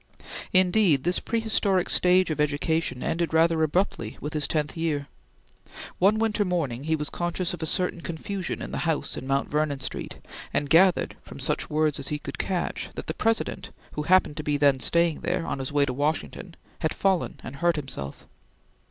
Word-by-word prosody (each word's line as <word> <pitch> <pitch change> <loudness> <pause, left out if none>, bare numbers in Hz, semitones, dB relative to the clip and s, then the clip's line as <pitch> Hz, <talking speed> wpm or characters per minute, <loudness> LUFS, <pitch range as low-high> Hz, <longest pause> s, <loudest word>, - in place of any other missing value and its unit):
Indeed 185 -6 +4
this 175 +2 +2
prehistoric 215 -5 +1
stage 180 -1 +3
of 155 - 0
education 150 -1 0
ended 165 -1 -1
rather 165 0 +4
abruptly 175 +6 0
with 150 - -5
his 150 -2 +2
tenth 150 -2 -1
year. 160 -4 -1 0.9
One 200 +4 +4
winter 220 -1 +1
morning 150 -9 -2
he 160 0 +2
was 150 -1 -3
conscious 175 +1 -2
of 175 - -7
a 160 - -1
certain 180 +1 0
confusion 175 +3 -4
in - - -6
the - - -3
house 160 - -1
in 130 - -6
Mount 135 0 0
Vernon 150 -2 0
Street, 130 - -5 0.4
and 145 -1 -1
gathered, 180 +2 +4
from - - -11
such - - -2
words 155 -1 +1
as 140 - -2
he 150 - -1
could 140 -1 -8
catch, 185 -3 -2
that - - -5
the - - -3
President, 225 0 0 0.2
who 150 - -3
happened 175 -1 +3
to 155 - -3
be 145 -1 0
then 140 -2 +4
staying 170 +2 +2
there, - - -1
on 140 - -3
his 135 +1 -3
way 145 -1 +3
to 125 - -3
Washington, 155 +5 -2 0.2
had 160 - -1
fallen 190 -3 0
and 140 - -8
hurt 170 +3 +2
himself. 130 - -6
160 Hz, 185 wpm, -26 LUFS, 145-180 Hz, 0.9 s, Indeed